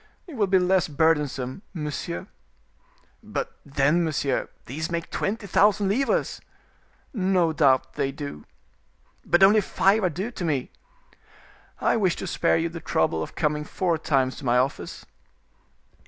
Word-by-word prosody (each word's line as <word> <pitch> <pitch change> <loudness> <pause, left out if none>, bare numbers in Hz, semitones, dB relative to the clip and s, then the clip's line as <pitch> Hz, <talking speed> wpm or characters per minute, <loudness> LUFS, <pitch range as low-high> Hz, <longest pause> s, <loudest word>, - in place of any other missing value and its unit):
"It 345 - -11
will 215 -6 +1
be 190 0 +4
less 185 0 +2
burdensome, 150 -2 0
monsieur." 160 +3 -4 1.0
"But, 475 - -5
then, 145 +4 +2
monsieur, 145 -4 -1 0.2
these 155 +5 -4
make 170 -1 -4
twenty 210 +1 -2
thousand 200 +1 +3
livres." 275 - 0 0.7
"No 185 -6 +2
doubt 130 -4 +3
they 135 - -1
do." 140 - -7 0.8
"But 175 +4 +3
only 210 +2 +7
five 195 +2 +2
are 185 - +3
due 190 +9 -4
to 195 - -6
me." 145 -6 -1 1.1
"I - - +2
wish 190 -5 +2
to - - -6
spare - - +1
you 165 +1 0
the 165 0 -7
trouble 80 - 0
of 80 - -6
coming 150 -1 0
four 170 +1 -1
times 135 -4 +1
to - - -10
my 120 0 +3
office." 130 +2 -2
165 Hz, 145 wpm, -25 LUFS, 140-195 Hz, 1.1 s, only